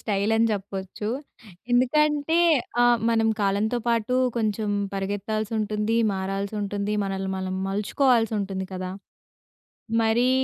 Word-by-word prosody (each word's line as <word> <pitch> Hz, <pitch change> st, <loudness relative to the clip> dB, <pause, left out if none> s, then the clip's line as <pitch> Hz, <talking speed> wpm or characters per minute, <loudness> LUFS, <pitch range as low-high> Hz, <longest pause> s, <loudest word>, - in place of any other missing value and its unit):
స్టైలని 220 Hz, +2 st, +1 dB
జెప్పచ్చు. 195 Hz, 0 st, -4 dB, 0.6 s
ఎందుకంటే 295 Hz, +5 st, +3 dB, 0.5 s
ఆహ్, 240 Hz, -1 st, +5 dB
మనం 225 Hz, -1 st, +2 dB
కాలంతో 205 Hz, +4 st, +1 dB
పాటు 230 Hz, +1 st, +1 dB, 0.2 s
కొంచం 215 Hz, -2 st, 0 dB, 0.2 s
పరిగెత్తాల్సుంటుంది, 210 Hz, +2 st, -1 dB, 0.2 s
మారాల్సుంటుంది, 200 Hz, +2 st, -2 dB
మనల్ని 195 Hz, 0 st, -3 dB
మనం 185 Hz, 0 st, -3 dB
మలుచుకోవాల్సుంటుంది 210 Hz, -2 st, +1 dB
కదా! 185 Hz, 0 st, -4 dB, 1.1 s
మరీ 230 Hz, +3 st, +3 dB
210 Hz, 85 wpm, -25 LUFS, 195-230 Hz, 1.1 s, ఆహ్